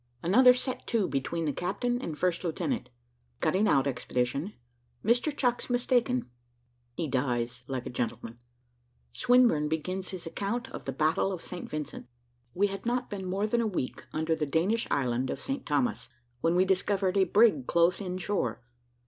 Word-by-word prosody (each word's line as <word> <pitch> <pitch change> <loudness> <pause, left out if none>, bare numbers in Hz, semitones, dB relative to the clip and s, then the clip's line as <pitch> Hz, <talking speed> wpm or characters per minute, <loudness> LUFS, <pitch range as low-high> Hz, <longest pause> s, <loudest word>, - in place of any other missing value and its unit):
ANOTHER 250 +8 +7
SET 255 0 -3
TO 225 -5 +1
BETWEEN 160 +5 -2
THE 145 - 0
CAPTAIN 240 - -1
AND 155 -3 -5
FIRST 180 +1 0
LIEUTENANT 180 - -2 0.5
CUTTING 205 +3 +2
OUT 135 -8 +4
EXPEDITION 135 +6 -1 0.5
MR. 245 +6 +2
CHUCKS 245 -1 0
MISTAKEN 250 0 +2 0.7
HE 165 - -2
DIES 125 -2 -1
LIKE 130 -2 -3
A - - -4
GENTLEMAN 120 -1 -4 0.7
SWINBURNE 245 -12 +4
BEGINS 185 +4 -2
HIS 185 -3 -6
ACCOUNT 230 +9 -3
OF - - -8
THE 135 - -2
BATTLE 155 +7 +1
OF 180 -3 -5
ST. 180 - -6
VINCENT. 150 -4 -5 0.5
We 200 - +3
had 195 -1 -4
not 245 +1 -1
been 190 -2 -4
more 195 +3 0
than 235 +2 +1
a 225 - +1
week 180 -11 -3
under 160 +1 0
the 155 -2 -2
Danish 185 +11 +1
island 130 -2 0
of - - -3
St. 275 -1 -4
Thomas, 125 -5 0 0.3
when 165 +6 +2
we 185 +1 +4
discovered 190 0 +1
a 195 - +5
brig 200 - +4
close 170 +3 +3
in 185 -2 -3
shore. 175 - -2
180 Hz, 165 wpm, -29 LUFS, 145-220 Hz, 0.7 s, ANOTHER